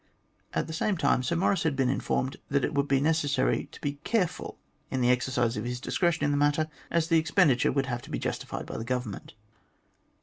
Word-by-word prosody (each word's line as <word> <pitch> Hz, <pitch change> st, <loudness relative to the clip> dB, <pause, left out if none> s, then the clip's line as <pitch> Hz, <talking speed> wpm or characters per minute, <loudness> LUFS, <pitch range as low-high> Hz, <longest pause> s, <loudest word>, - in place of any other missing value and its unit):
At -, -, +1 dB
the 160 Hz, -, -7 dB
same 190 Hz, +4 st, 0 dB
time, 140 Hz, -4 st, +2 dB
Sir 150 Hz, +7 st, -1 dB
Maurice 180 Hz, +1 st, +2 dB
had 160 Hz, -4 st, +1 dB
been 135 Hz, -1 st, +2 dB
informed 130 Hz, 0 st, -1 dB
that 140 Hz, 0 st, +2 dB
it -, -, -3 dB
would 140 Hz, 0 st, +1 dB
be 135 Hz, -1 st, +3 dB
necessary 145 Hz, -3 st, +1 dB
to -, -, -12 dB
be 145 Hz, -1 st, -3 dB
careful 205 Hz, -8 st, -1 dB, 0.3 s
in 130 Hz, -, -1 dB
the 125 Hz, 0 st, +4 dB
exercise 125 Hz, -2 st, +1 dB
of 105 Hz, -, -2 dB
his 125 Hz, 0 st, -3 dB
dis -, -, -3 dB
cretion 170 Hz, -4 st, +2 dB
in 145 Hz, -, +2 dB
the 145 Hz, -, +1 dB
matter, 145 Hz, +2 st, +2 dB, 0.2 s
as 165 Hz, -1 st, +1 dB
the 165 Hz, -1 st, +4 dB
expenditure 155 Hz, -4 st, +3 dB
would 135 Hz, 0 st, +1 dB
have 120 Hz, -2 st, -3 dB
to -, -, -13 dB
be -, -, -2 dB
justified -, -, -4 dB
by -, -, -6 dB
the 110 Hz, -, -4 dB
Government. 125 Hz, -4 st, -4 dB
140 Hz, 225 wpm, -28 LUFS, 125-160 Hz, 0.3 s, the